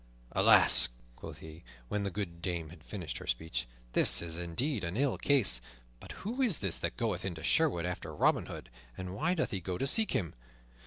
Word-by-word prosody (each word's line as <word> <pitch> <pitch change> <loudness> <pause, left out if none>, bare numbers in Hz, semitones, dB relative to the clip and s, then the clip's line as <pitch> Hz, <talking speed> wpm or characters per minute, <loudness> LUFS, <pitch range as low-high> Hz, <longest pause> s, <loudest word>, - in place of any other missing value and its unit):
"Alas," - - +7 0.3
quoth - - -10
he, 80 +1 -12 0.2
when 105 - -2
the 100 - -2
good 85 -3 -6
dame 85 -3 -3
had 80 -1 -15
finished 90 -2 -6
her - - -11
speech, 80 +6 -3 0.3
"this - - +6
is 85 -1 -3
indeed 95 - -3
an 85 +4 -3
ill 140 -1 +1
case. 110 - +3 0.4
But - - -11
who 240 +6 -3
is 230 - +2
this 95 -4 -3
that - - -4
goeth - - -2
into 85 -4 -5
Sherwood 140 - +1
after 90 0 -5
Robin - - +1
Hood, - - -9 0.3
and 90 0 -6
why 165 - 0
doth 160 - -2
he 95 - -3
go 90 0 -5
to 135 - -2
seek 220 +10 +3
him? 85 -6 -2
90 Hz, 200 wpm, -31 LUFS, 85-135 Hz, 0.4 s, Alas